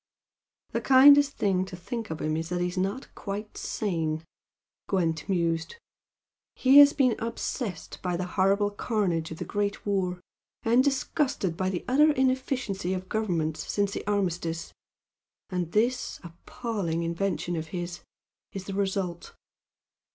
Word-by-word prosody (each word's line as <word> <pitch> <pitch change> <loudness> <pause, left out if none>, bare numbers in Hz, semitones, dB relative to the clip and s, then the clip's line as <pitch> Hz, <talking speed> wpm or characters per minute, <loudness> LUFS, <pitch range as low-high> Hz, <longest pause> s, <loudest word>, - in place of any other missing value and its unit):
"The - - -1
kindest 280 +2 +7
thing 190 -2 +2
to 190 -1 -8
think 210 +6 -5
of 160 -1 -5
him 155 0 0
is 165 +1 -3
that 180 0 -1
he's 180 +1 -1
not 195 +8 -2
quite 205 +1 -6
sane," 160 -6 -2 0.6
Gwent 165 -4 0
mused 170 - 0 0.8
"He 270 +2 +7
has 285 0 +9
been 260 -5 +2
obsessed 230 -2 -4
by 180 -2 -1
the 180 - -2
horrible 200 +2 +2
carnage 195 -7 -1
of 160 - -7
the - - -5
Great 205 -1 -2
War, 185 -3 0 0.4
and 235 +3 +4
disgusted 270 - 0
by 185 +2 -1
the 180 -2 -4
utter 300 +5 +5
inefficiency 255 -8 0
of 185 +1 -6
Governments 170 -8 -1
since 200 -1 +1
the - - -4
armistice, 175 -5 -1 0.8
and 175 -2 -2
this 240 +5 0
appalling 170 0 -4
invention 175 +1 -1
of 160 -1 -4
his 175 +1 -5 0.5
is 195 - -5
the 195 - -6
result." 190 -3 -2
195 Hz, 140 wpm, -27 LUFS, 175-225 Hz, 0.8 s, has